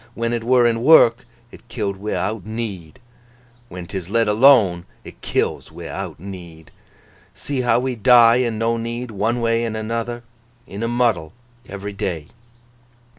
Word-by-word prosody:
When 115 Hz, 0 st, -2 dB
it 115 Hz, -1 st, -2 dB
were 125 Hz, 0 st, +3 dB
in 115 Hz, -1 st, +1 dB
work, 120 Hz, -5 st, +5 dB, 0.2 s
it -, -, -16 dB
killed 105 Hz, -5 st, -3 dB
wi'out 105 Hz, 0 st, -3 dB
need; 105 Hz, -7 st, -6 dB, 0.7 s
when 90 Hz, -1 st, -8 dB
'tis 90 Hz, 0 st, -6 dB
let 115 Hz, +1 st, +1 dB
alone, 105 Hz, -6 st, +4 dB, 0.2 s
it -, -, -13 dB
kills -, -, -2 dB
wi'out -, -, -7 dB
need. 85 Hz, -4 st, -11 dB, 0.6 s
See 140 Hz, -3 st, -3 dB
how 120 Hz, -1 st, +2 dB
we 130 Hz, -1 st, -2 dB
die 120 Hz, +1 st, +6 dB
an' 120 Hz, -3 st, -1 dB
no 115 Hz, +1 st, 0 dB
need, 115 Hz, +1 st, -5 dB
one 110 Hz, +4 st, -1 dB
way 115 Hz, 0 st, +1 dB
an' 115 Hz, -2 st, -3 dB
another—in 115 Hz, 0 st, -7 dB
a 115 Hz, -, -1 dB
muddle—every 120 Hz, -1 st, -3 dB
day! 85 Hz, -6 st, -4 dB
115 Hz, 140 wpm, -20 LUFS, 100-120 Hz, 0.7 s, die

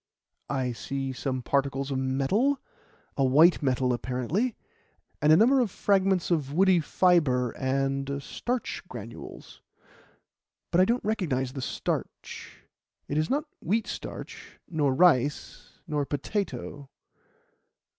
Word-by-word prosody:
"I 130 Hz, -3 st, -1 dB
see 135 Hz, +3 st, -4 dB
some 130 Hz, -1 st, -3 dB
particles 140 Hz, +1 st, 0 dB
of 130 Hz, -, -1 dB
metal 140 Hz, -, +1 dB, 0.6 s
a 135 Hz, -, +1 dB
white 155 Hz, +8 st, +5 dB
metal 130 Hz, -2 st, +1 dB
apparently 130 Hz, -, -1 dB, 0.7 s
and 150 Hz, -, +5 dB
a 155 Hz, -, +8 dB
number 255 Hz, +6 st, +5 dB
of 240 Hz, -4 st, +2 dB
fragments 190 Hz, -2 st, +1 dB
of 150 Hz, -5 st, 0 dB
woody 185 Hz, +3 st, +4 dB
fibre 150 Hz, -8 st, +2 dB
and 135 Hz, +1 st, -1 dB
starch 245 Hz, -, -3 dB
granules, 115 Hz, -, -10 dB, 1.1 s
but 175 Hz, -, +4 dB
I -, -, +6 dB
don't 235 Hz, +3 st, 0 dB
recognize 140 Hz, -, -1 dB
the 135 Hz, -, -5 dB
starch. -, -, -5 dB, 0.4 s
It 145 Hz, -, 0 dB
is 155 Hz, -, 0 dB
not 295 Hz, +3 st, 0 dB, 0.2 s
wheat 215 Hz, +5 st, 0 dB
starch, -, -, -8 dB
nor 150 Hz, -5 st, +1 dB
rice, 145 Hz, -2 st, +2 dB
nor 150 Hz, -2 st, -1 dB
potato. 145 Hz, -4 st, -4 dB
145 Hz, 120 wpm, -27 LUFS, 130-185 Hz, 1.1 s, a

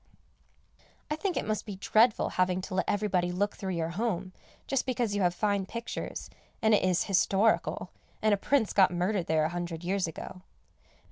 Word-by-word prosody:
I -, -, +2 dB
think 360 Hz, +3 st, -2 dB
it -, -, -1 dB
must 215 Hz, -1 st, -1 dB
be 205 Hz, -3 st, -7 dB
dreadful 220 Hz, +4 st, +3 dB
having 185 Hz, 0 st, +1 dB
to 185 Hz, -, -7 dB
let 185 Hz, -, 0 dB
everybody 190 Hz, -4 st, +1 dB
look 200 Hz, +3 st, -1 dB
through 190 Hz, -2 st, -4 dB
your 165 Hz, -1 st, -1 dB
home, 190 Hz, -1 st, -2 dB, 0.3 s
just 270 Hz, -1 st, -1 dB
because 240 Hz, -4 st, 0 dB
you 205 Hz, -, 0 dB
have 180 Hz, -1 st, +2 dB
fine 200 Hz, -2 st, 0 dB
pictures, 235 Hz, +3 st, -5 dB, 0.3 s
and 220 Hz, 0 st, +3 dB
it 210 Hz, -, +5 dB
is 185 Hz, -1 st, +2 dB
historical, 195 Hz, +2 st, +1 dB, 0.3 s
and 215 Hz, -1 st, +3 dB
a -, -, +6 dB
prince 235 Hz, +1 st, +1 dB
got 190 Hz, -2 st, +6 dB
murdered 180 Hz, +1 st, -1 dB
there 155 Hz, -1 st, +2 dB
a -, -, 0 dB
hundred 175 Hz, -1 st, -4 dB
years 185 Hz, 0 st, 0 dB
ago. 170 Hz, +3 st, -8 dB
195 Hz, 185 wpm, -29 LUFS, 180-215 Hz, 0.3 s, a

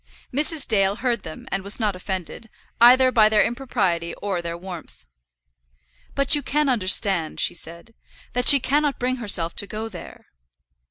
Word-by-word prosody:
Mrs. 295 Hz, +2 st, +2 dB
Dale 200 Hz, -4 st, +2 dB
heard 235 Hz, -2 st, -2 dB
them, 160 Hz, -3 st, -11 dB
and 195 Hz, -, -2 dB
was 200 Hz, +4 st, -2 dB
not 210 Hz, -4 st, -1 dB
offended 190 Hz, +4 st, -6 dB, 0.3 s
either 255 Hz, +2 st, +6 dB
by 215 Hz, -3 st, +4 dB
their 215 Hz, -1 st, +3 dB
impropriety 210 Hz, -9 st, -2 dB
or 195 Hz, -4 st, -4 dB
their 170 Hz, 0 st, -6 dB
warmth. 170 Hz, -, -11 dB, 1.1 s
"But 275 Hz, +1 st, +3 dB
you 295 Hz, -, +4 dB
can 295 Hz, +1 st, -1 dB
understand," 190 Hz, -7 st, +1 dB
she -, -, +2 dB
said, 170 Hz, +6 st, -7 dB, 0.4 s
"that 250 Hz, 0 st, -2 dB
she 280 Hz, -, +9 dB
cannot 290 Hz, +2 st, 0 dB
bring 255 Hz, +1 st, -2 dB
herself 195 Hz, -8 st, -1 dB
to 200 Hz, -, +2 dB
go 220 Hz, +2 st, -6 dB
there." 180 Hz, -5 st, -12 dB
215 Hz, 160 wpm, -22 LUFS, 185-255 Hz, 1.1 s, she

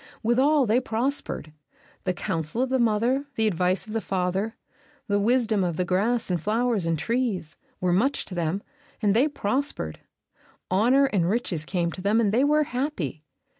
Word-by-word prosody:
Withal, 265 Hz, +5 st, +3 dB
they 225 Hz, +2 st, +3 dB
prospered; 240 Hz, -, -2 dB, 0.5 s
the 185 Hz, -, +1 dB
counsel 165 Hz, +9 st, -1 dB
of 260 Hz, -, -2 dB
the 260 Hz, 0 st, +1 dB
mother, 240 Hz, +5 st, +1 dB
the 220 Hz, -, +2 dB
advice 185 Hz, -1 st, +1 dB
of 215 Hz, -, -8 dB
the 225 Hz, -, 0 dB
father, 190 Hz, +4 st, -1 dB, 0.5 s
the 205 Hz, -1 st, +2 dB
wisdom 225 Hz, -2 st, +2 dB
of 170 Hz, -3 st, -1 dB
the 180 Hz, -, 0 dB
grass 210 Hz, +5 st, 0 dB
and 175 Hz, -3 st, 0 dB
flowers 220 Hz, -2 st, +1 dB
and 165 Hz, -1 st, +1 dB
trees, 210 Hz, -, -1 dB, 0.2 s
were 180 Hz, -1 st, +1 dB
much 255 Hz, +10 st, +1 dB
to -, -, -8 dB
them, 175 Hz, +3 st, -1 dB, 0.4 s
and 205 Hz, -2 st, +2 dB
they 260 Hz, +6 st, +4 dB
prospered. 260 Hz, -, -2 dB, 0.7 s
Honor 245 Hz, +9 st, +4 dB
and 190 Hz, -10 st, +1 dB
riches 185 Hz, -8 st, -1 dB
came 170 Hz, -1 st, -1 dB
to 185 Hz, -, -8 dB
them, 205 Hz, +4 st, +2 dB
and 215 Hz, -4 st, +2 dB
they 240 Hz, +5 st, +3 dB
were 300 Hz, +1 st, +4 dB
happy. 250 Hz, -, -3 dB
215 Hz, 170 wpm, -25 LUFS, 180-250 Hz, 0.7 s, they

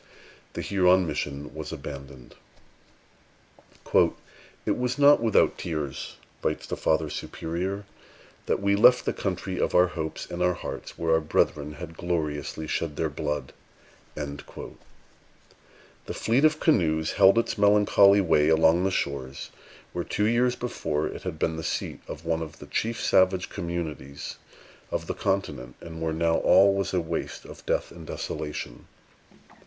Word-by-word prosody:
The -, -, -4 dB
Huron 95 Hz, -1 st, +4 dB
mission 75 Hz, -2 st, -4 dB
was 80 Hz, 0 st, -6 dB
abandoned. 70 Hz, -4 st, -9 dB, 1.6 s
"It -, -, 0 dB
was 125 Hz, +1 st, -1 dB
not 145 Hz, -1 st, +6 dB
without 115 Hz, -2 st, +3 dB
tears," 75 Hz, -5 st, -4 dB, 0.3 s
writes -, -, -1 dB
the -, -, -3 dB
Father 80 Hz, 0 st, +1 dB
Superior, 90 Hz, +6 st, -4 dB, 0.6 s
"that -, -, +1 dB
we 100 Hz, 0 st, +2 dB
left 125 Hz, +5 st, +6 dB
the -, -, 0 dB
country 95 Hz, -1 st, -3 dB
of -, -, 0 dB
our 90 Hz, -, +7 dB
hopes 80 Hz, -3 st, -4 dB
and 85 Hz, -, -6 dB
our 90 Hz, 0 st, +3 dB
hearts, -, -, -7 dB
where 85 Hz, 0 st, 0 dB
our 80 Hz, -, +5 dB
brethren 75 Hz, -1 st, 0 dB
had 80 Hz, +1 st, -9 dB
gloriously 80 Hz, -3 st, -2 dB
shed 75 Hz, -1 st, -2 dB
their 80 Hz, -1 st, -1 dB
blood." 75 Hz, -2 st, -3 dB, 0.6 s
The 70 Hz, -1 st, -7 dB, 1.4 s
fleet 125 Hz, +7 st, +2 dB
of 155 Hz, 0 st, +3 dB
canoes 80 Hz, -, +2 dB
held 100 Hz, +1 st, +6 dB
its 115 Hz, +1 st, +1 dB
melancholy 100 Hz, -1 st, +6 dB
way 75 Hz, -4 st, +3 dB
along 80 Hz, +2 st, +4 dB
the 95 Hz, -, +2 dB
shores 70 Hz, -7 st, -3 dB, 0.4 s
where -, -, -2 dB
two 105 Hz, -, -1 dB
years 120 Hz, +2 st, +2 dB
before 80 Hz, -11 st, -2 dB
had 80 Hz, -, -6 dB
been 80 Hz, +1 st, -1 dB
the 80 Hz, -, -5 dB
seat -, -, -3 dB
of 80 Hz, -, -8 dB
one 80 Hz, 0 st, 0 dB
of 80 Hz, -2 st, -7 dB
the -, -, -11 dB
chief 115 Hz, +1 st, -2 dB
savage 95 Hz, 0 st, +3 dB
communities 80 Hz, -6 st, -5 dB, 0.5 s
of -, -, -2 dB
the -, -, -3 dB
continent, 75 Hz, -11 st, -2 dB
and 80 Hz, -1 st, -9 dB
where 80 Hz, 0 st, 0 dB
now 80 Hz, +1 st, +2 dB
all 95 Hz, +2 st, +6 dB
was 100 Hz, 0 st, -1 dB
a 90 Hz, -, +1 dB
waste 80 Hz, -, -4 dB
of -, -, -11 dB
death -, -, 0 dB
and 80 Hz, -2 st, -11 dB
desolation. 65 Hz, -5 st, -5 dB
85 Hz, 150 wpm, -26 LUFS, 75-100 Hz, 1.6 s, our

